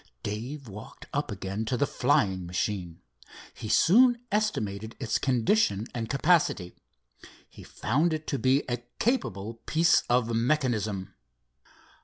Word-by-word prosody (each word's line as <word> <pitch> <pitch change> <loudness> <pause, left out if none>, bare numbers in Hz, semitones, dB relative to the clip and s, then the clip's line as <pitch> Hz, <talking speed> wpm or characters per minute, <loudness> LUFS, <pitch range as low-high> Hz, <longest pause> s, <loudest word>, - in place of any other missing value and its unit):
Dave 125 +7 -5
walked 105 +1 -10
up 145 -2 -1
again 100 +2 -4
to 125 +3 -1
the 145 - +2
flying 95 -9 +1
machine. 90 -2 -3 0.5
He 110 - -7
soon 240 - +5
estimated 110 - -1
its 125 -5 -1
condition 120 - +2
and 115 -2 -4
capacity. 145 - +2 0.7
He - - -14
found 150 +10 0
it 155 0 -3
to 140 - -2
be 130 +4 +3
a 120 -1 -1 0.2
capable 115 - -1
piece 165 +2 +4
of 120 -1 +2
mechanism. 115 -7 0
115 Hz, 125 wpm, -28 LUFS, 105-150 Hz, 0.7 s, soon